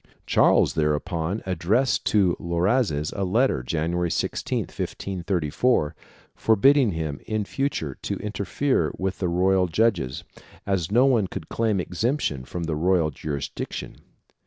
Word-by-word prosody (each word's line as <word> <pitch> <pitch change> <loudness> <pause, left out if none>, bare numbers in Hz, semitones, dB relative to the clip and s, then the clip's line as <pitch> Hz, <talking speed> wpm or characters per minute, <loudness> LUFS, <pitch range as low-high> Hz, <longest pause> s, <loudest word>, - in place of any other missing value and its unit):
Charles - - +4
thereupon 80 +5 -1
addressed 95 +8 +1
to 95 -5 +3
Loazes 85 - 0
a 100 - -1
letter, 110 - +2
January 85 +6 -1
16, - - -1
1534, 90 0 -1 0.4
forbidding 120 +1 +4
him 80 -3 -3
in 110 -1 -1
future 100 - -2
to - - -3
interfere 105 - -1
with 95 0 -2
the 90 - 0
royal 90 +1 +2
judges, 85 - 0 0.4
as 95 -3 -1
no 120 +5 +5
one 120 -8 +3
could 80 - -7
claim 110 -4 0
exemption 90 - -1
from 85 +4 -5
the 80 -2 -2
royal 85 -1 +2
jurisdiction. 70 -1 -5
90 Hz, 125 wpm, -24 LUFS, 80-110 Hz, 0.4 s, no